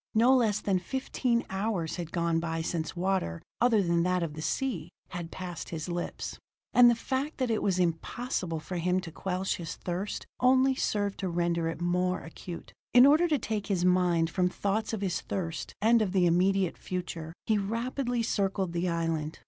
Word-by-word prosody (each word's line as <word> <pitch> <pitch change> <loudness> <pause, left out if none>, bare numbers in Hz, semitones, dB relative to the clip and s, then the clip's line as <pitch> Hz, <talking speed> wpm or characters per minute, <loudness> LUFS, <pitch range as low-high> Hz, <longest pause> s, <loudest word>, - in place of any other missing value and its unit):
No 240 +4 +6
less 215 -5 +2
than 190 -2 +1
fifteen 245 +2 -1
hours 190 -4 -1
had 170 -2 -5
gone 170 -1 +1
by 165 -1 -2
since 160 0 -3
water 180 - 0 0.2
other 230 -4 +4
than 170 -1 +2
that 180 0 +1
of 160 -3 -3
the 155 - -6
sea 180 - -2 0.2
had 175 -1 -5
passed 175 -2 -6
his 160 -1 -4
lips. 175 0 -4 0.3
And 245 -1 +8
the 235 - +4
fact 265 +6 -2
that 255 -3 0
it 220 - +1
was 190 -3 +1
impossible 175 +1 -1
for 175 +4 -5
him 180 +2 +1
to 170 -2 -8
quench 190 +2 -2
his 165 -3 -5
thirst 185 +3 -4
only 260 +1 +5
served 205 -6 -1
to 190 - -1
render 170 -1 0
it 165 - -6
more 180 +1 +1
acute. 170 +1 -9 0.2
In 250 +1 +10
order 310 +5 +6
to 305 -3 +2
take 215 -3 -3
his 185 -4 +1
mind 180 -2 +3
from 180 -1 +2
thoughts 205 +4 -1
of 220 -3 -3
his 190 -3 -1
thirst 170 -4 -4
and 230 +1 +5
of 195 -3 0
the 185 -2 +4
immediate 185 +2 +2
future, 175 -3 -5
he 215 -2 +2
rapidly 240 +4 -1
circled 195 -5 0
the 175 +1 0
island. 165 -2 -1
185 Hz, 190 wpm, -29 LUFS, 170-220 Hz, 0.3 s, In